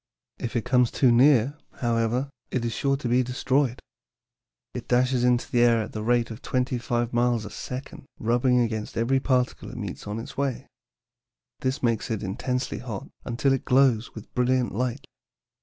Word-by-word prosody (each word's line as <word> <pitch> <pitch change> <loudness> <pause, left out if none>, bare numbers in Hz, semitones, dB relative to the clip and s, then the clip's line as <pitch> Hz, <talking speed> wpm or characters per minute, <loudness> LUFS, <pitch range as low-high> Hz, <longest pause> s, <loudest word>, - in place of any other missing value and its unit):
If 120 - -4
it 120 - 0
comes 125 -1 +3
too 130 -3 +3
near, 135 +2 +4
however, 120 +3 0 0.2
it 125 -2 -1
is 115 - -1
sure 135 +4 +1
to 135 - -4
be 125 +2 +3
destroyed. 130 +1 0 0.9
It - - -6
dashes 125 0 +2
into 125 -1 +2
the 120 - +3
air 120 -1 +5
at 110 - -8
the 110 - -5
rate 120 +1 +1
of 110 - -8
twenty 125 -1 -1
five 120 0 -1
miles 120 -2 +2
a 105 - -8
second, 130 +1 -7
rubbing 120 +2 +2
against 110 -2 -2
every 125 +4 +2
particle 125 -2 0
it 125 - -9
meets 100 -3 -6
on 105 +1 -3
its 115 - -7
way. 135 -1 -2 0.9
This 130 +1 -2
makes 115 -3 0
it 110 -3 -2
intensely 125 +6 -2
hot, 115 -6 -6 0.2
until 130 +3 +1
it 135 - -1
glows 125 -3 +3
with 110 0 -10
brilliant 125 0 +1
light. 125 +5 -2
125 Hz, 175 wpm, -26 LUFS, 115-130 Hz, 0.9 s, air